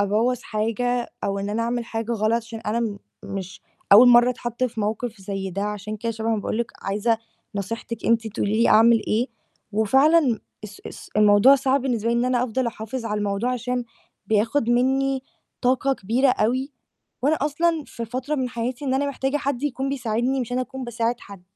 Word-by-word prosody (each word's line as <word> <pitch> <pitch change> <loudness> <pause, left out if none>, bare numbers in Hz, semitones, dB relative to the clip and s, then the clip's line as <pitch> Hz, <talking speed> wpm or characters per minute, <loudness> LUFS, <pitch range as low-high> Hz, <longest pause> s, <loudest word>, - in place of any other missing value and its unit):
أبوّظ 220 +5 +1
حاجة 235 +3 -1 0.2
أو 200 0 -1
إن 200 +1 -3
أنا 225 +2 -1
أعمل 240 0 -1
حاجة 225 0 -3
غلط 215 0 +1
عشان 225 0 -8
أنا 225 +2 -1
م 215 -3 -2 0.3
مش 190 -1 -6 0.3
أوّل 245 +5 +9
مَرّة 240 +1 +7
أتحط 240 0 -3
في 230 -3 -3
موقِف 215 +1 -3
زي 195 0 -4
ده 195 +3 -3
عشان 210 0 -4
كده 230 +2 -3
شبعًا 225 0 -1
باقول 220 - -3
لِك 235 - -2
عايزة 210 +3 0 0.4
نصيحتِك 230 +3 -5
أنتِ 230 -1 +2
تقولي 220 0 0
لي - - +4
أعمل 225 +1 +6
إيه، 230 +4 +1 0.5
وفعلًا 265 +4 +4 0.3
اس 205 -1 -10
اس - - -10
الموضوع 210 +5 +7
صعب 270 0 +1
بالنسبة 235 -4 -1
لي - - +1
إن 240 - +1
أنا 250 -1 +1
أفضل 255 +1 -1
أحافظ 230 +2 -5
على 210 -2 -2
الموضوع 205 +4 -1
عشان 250 0 -2 0.4
بياخد 225 +4 +1
مِنّي 265 +2 +2 0.4
طاقة 260 +2 +2
كبيرة 245 +5 +1
أوي، 255 +4 +1 0.5
وأنا 300 +3 +3
أصلًا 310 +2 +1
في 235 - -6
فترة 255 +6 -3
من 260 -3 -1
حياتي 245 +3 -4
إن 260 -1 0
أنا 280 +2 +1
محتاجة 270 0 -1
حد 275 -3 -2
يكون 275 -2 -2
بيساعدني 255 0 -1
مش 245 -1 -4
أنا 250 - 0
أكون 260 +1 -5
باساعد 235 0 -2
حَد. 200 -2 -12
235 Hz, 185 wpm, -23 LUFS, 215-255 Hz, 0.5 s, أوّل